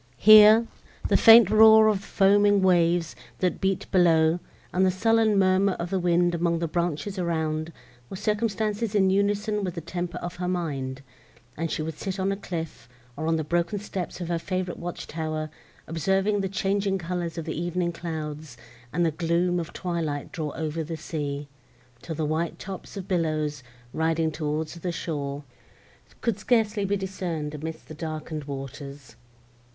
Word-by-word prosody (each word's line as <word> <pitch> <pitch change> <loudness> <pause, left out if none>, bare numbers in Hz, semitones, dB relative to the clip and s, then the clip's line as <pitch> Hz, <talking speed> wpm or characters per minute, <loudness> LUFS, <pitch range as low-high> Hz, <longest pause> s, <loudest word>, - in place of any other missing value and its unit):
Here, 215 - +8 0.4
the - - +3
faint 225 -3 +8
roar 220 0 +8
of 205 -2 +1
foaming 205 0 +3
waves, 175 -2 +2 0.2
that 180 -3 -1
beat 195 0 0
below, 165 -2 +4 0.3
and 185 - +2
the 190 - +4
sullen 220 +2 +2
murmur 190 0 +3
of 175 +1 -5
the 190 - +1
wind 175 0 +2
among 170 0 +1
the 165 0 -2
branches 175 +4 -2
around, 160 -2 -1 0.4
were - - -6
circumstances 210 +1 -1
in 190 -2 +4
unison 205 +1 0
with 180 -2 -3
the 170 - -4
temper 175 +1 -4
of 175 0 -6
her 180 0 -3
mind; 140 -7 -3 0.5
and 165 +2 -3
she 155 - -2
would 160 -1 -6
sit 190 0 -4
on 190 +1 +1
a - - 0
cliff, 165 - -6 0.3
or 155 +2 -4
on 165 - +2
the 160 - -1
broken 170 +5 -1
steps 195 -3 -5
of 175 - -4
her 170 -1 0
favourite 185 +1 -3
watch 175 0 -6
tower, 155 -1 -4 0.3
observing 195 +5 0
the 195 - -2
changing 195 0 0
colours 175 -1 -4
of 165 - -4
the - - -3
evening 175 0 -1
clouds, 155 -5 -6 0.3
and 175 +3 +1
the 165 - +2
gloom 170 +2 0
of 165 - -5
twilight 165 -5 -3
draw 155 -3 -3
over 160 0 -3
the 160 +1 -5
sea, 145 -3 -4 0.5
till 160 - -6
the 155 0 -1
white 160 +2 -2
tops 195 +1 -8
of 190 -1 -6
billows, 155 -5 -1 0.3
riding 160 0 0
towards 155 0 -3
the 175 +1 -4
shore, 145 -4 -4 0.8
could 220 -4 -1
scarcely 215 -2 +1
be 200 +1 0
discerned 175 -6 -4
amidst 155 +2 -7
the - - -9
darkened 155 -1 -5
waters. 140 0 -8
175 Hz, 165 wpm, -26 LUFS, 160-195 Hz, 0.8 s, Here